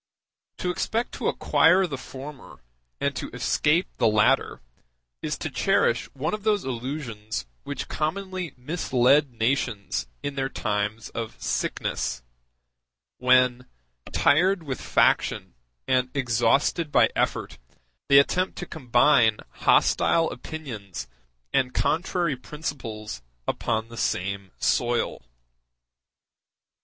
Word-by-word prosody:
To 180 - -1
expect 225 +6 -1
to - - -3
acquire 180 +4 +4
the 150 -6 -4
former 135 - -10 0.4
and - - 0
to - - -4
escape 160 +5 +2
the 120 - +3
latter 105 -1 +3 0.6
is - - -2
to - - -4
cherish - - +2
one 145 +8 -2
of 210 - -3
those 210 -2 +1
illusions 120 - -4 0.2
which - - -4
commonly 185 +1 -3
mislead 140 0 +2
nations 115 - -1 0.2
in 145 - -2
their 135 -1 -2
times 105 -1 -2
of 115 -1 -6
sickness, - - -2 1.0
when, 125 0 +3 0.4
tired 180 +4 +3
with 135 -4 -4
faction - - +2 0.3
and 130 0 +2
exhausted 135 +5 +2
by - - +4
effort, - - -1 0.5
they 140 - +8
attempt 180 +7 +3
to 175 - -4
combine 120 -6 +3
hostile 165 -1 +3
opinions 110 - -7 0.5
and 125 -1 +1
contrary 170 -2 +1
principles 125 - -6 0.3
upon 110 +1 -1
the 115 - -10
same 100 0 -2
soil. 120 0 0
130 Hz, 105 wpm, -25 LUFS, 115-160 Hz, 1.0 s, they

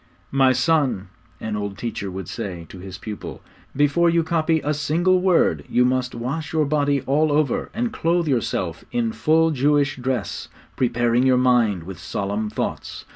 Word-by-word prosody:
'My 135 -1 +4
son,' 130 - +1 0.3
an 110 -1 -4
old 100 -1 -4
teacher 110 -4 -4
would 95 -1 -6
say 90 -3 -5
to 95 - -10
his 95 0 -8
pupil, 105 +2 -8 0.3
'before 145 +5 +3
you 170 0 +2
copy 160 0 +1
a 150 - 0
single 170 +5 +2
word 170 - +2
you 125 - +3
must 125 0 0
wash 140 +8 -4
your 155 -1 +2
body 145 -1 +1
all 145 +4 +1
over, 145 -3 +1
and 235 +1 -2
clothe 170 0 +1
yourself 100 - -1
in 235 -2 0
full 160 -5 +2
Jewish 145 0 +2
dress, 125 -4 -3 0.3
preparing 120 -1 +1
your 130 -1 +4
mind 120 -8 +2
with 90 -1 -9
solemn 100 +4 -3
thoughts. 110 - -4
130 Hz, 165 wpm, -22 LUFS, 105-155 Hz, 0.3 s, My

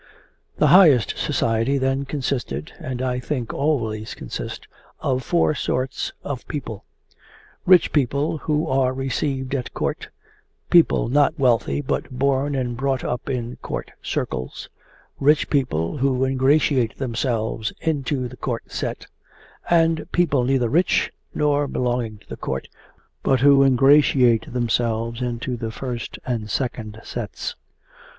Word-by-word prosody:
The - - +4
highest 155 - +6
society 115 +5 0
then 135 +1 0
consisted, 125 - -3
and 130 -1 -4
I 125 -1 -1
think 125 -3 -3
always 110 -8 -1
consist, - - -6 0.3
of 130 -1 0
four 170 +3 +2
sorts 130 -2 -2
of 140 -3 -5
people: 120 -8 -6 0.8
rich 180 -2 +6
people 145 +2 +1
who 150 +1 0
are 130 -1 +1
received 135 0 -2
at 130 -3 -3
Court, - - -3 0.6
people 170 -8 +5
not 145 +5 +3
wealthy 130 0 +2
but 140 - -2
born 140 +2 0
and 125 -2 -2
brought 135 +1 -1
up 125 +3 -3
in 125 -2 -3
Court - - -5
circles, 65 -1 -4 0.5
rich 150 +2 +3
people 125 - 0
who 130 -1 +1
ingratiate 130 -2 +2
themselves 115 -3 -2
into 140 -4 -1
the 125 +1 -12
Court 120 -3 -4
set, - - -4 0.6
and 165 -2 +2
people 150 -7 +2
neither 130 -1 +2
rich 165 +10 +2 0.2
nor 145 -1 +2
belonging 120 -4 -1
to 105 - -24
the - - -7
Court 65 0 -4 0.5
but 130 -2 +2
who 140 0 +6
ingratiate 135 -3 +4
themselves 115 -1 -1
into 120 0 -2
the 115 -1 -4
first 120 0 -5
and 115 -4 -3
second 110 -3 -3
sets. 115 -4 -5
130 Hz, 130 wpm, -22 LUFS, 120-140 Hz, 0.8 s, highest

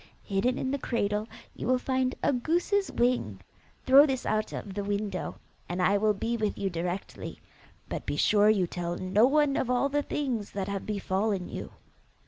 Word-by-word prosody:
Hidden 220 +6 0
in 260 - -2
the 280 - -1
cradle, 210 -3 -1 0.3
you - - -5
will 255 0 +4
find 260 0 0
a 285 - +3
goose's 350 +10 +1
wing: 240 - 0 0.5
throw 275 +3 +8
this 260 -2 -2
out 215 0 0
of 200 - -6
the 205 +1 -3
window, 200 -2 -2 0.3
and 175 +1 -3
I 195 +3 +3
will 210 0 +2
be 230 +4 -1
with 215 -2 -1
you 195 -1 -1
directly; 175 +3 -4 0.5
but - - -5
be - - -1
sure 210 0 +4
you 200 -4 +3
tell 175 0 -4
no 200 +6 +3
one 295 0 +3
of 250 - 0
all 250 +3 +2
the 290 +1 +1
things 255 -8 -3
that 195 -1 -3
have 200 -1 -4
befallen 200 -2 -1
you. - - -7
215 Hz, 185 wpm, -28 LUFS, 195-260 Hz, 0.5 s, throw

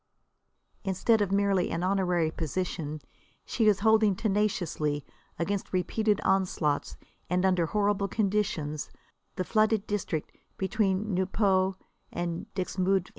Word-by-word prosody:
Instead 200 +4 +2
of 200 -2 0
merely 195 -2 +2
an 165 +1 -2
honorary 180 -4 +1
position, 160 -2 -3 0.4
she 225 -3 +1
is 200 -2 +4
holding 220 -2 +4
tenaciously, 180 -8 0 0.3
against 195 +3 -2
repeated 210 +3 +1
onslaughts 180 -6 0 0.3
and 180 +2 +1
under 180 -3 +2
horrible 205 0 +1
conditions, 195 -9 -1 0.5
the 185 - -1
flooded 215 +1 +2
district 190 -7 -3 0.3
between 195 +1 0
Nieuport 190 0 +2 0.4
and 170 -1 -4
Dixmude. 185 0 0
190 Hz, 110 wpm, -28 LUFS, 175-205 Hz, 0.5 s, is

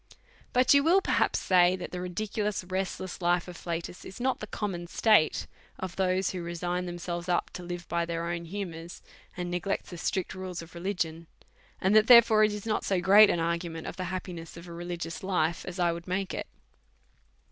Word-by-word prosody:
But 250 +2 +5
you 280 0 +5
will 345 +5 +5
perhaps - - +1
say, 180 -1 +4
that 185 - -7
the 180 - -4
ridiculous, 205 +2 -2
rest 185 +1 -3
less 185 0 -7
life 175 0 +2
of 180 - -8
Flatus 170 +1 -5
is 190 - -10
not 260 +1 0
the 215 - -6
common 185 -5 -4
state 210 -3 +3 0.3
of 185 -1 -5
those 185 0 +1
who 185 - -4
resign 175 +1 -3
themselves 175 0 -5
up 175 - 0
to - - -7
live 175 0 -6
by 170 0 -1
their 170 0 -2
own 170 0 -3
hu 200 +4 -4
mours, 165 0 -9 0.3
and 175 -1 -3
neglect 180 +3 -2
the 175 - -7
strict 185 +1 -2
rules 185 -2 -6
of 165 - -15
religion; 170 -2 -3 0.5
and 190 +3 +2
that, 215 0 +6
therefore, 235 -3 +8
it 215 - +4
is 210 0 -6
not 215 -1 0
so 190 -2 +1
great 200 +4 +7
an 175 - +1
argument 170 0 -2
of - - -5
the 185 - -3
happiness 175 -3 -6
of 170 +1 -10
a 170 - -8
religious 170 -1 -5
life 170 -3 0
as 180 0 -6
I 175 -1 +3
would 170 +1 -7
make 185 +1 -2
it. - - -4
180 Hz, 205 wpm, -29 LUFS, 170-195 Hz, 0.5 s, therefore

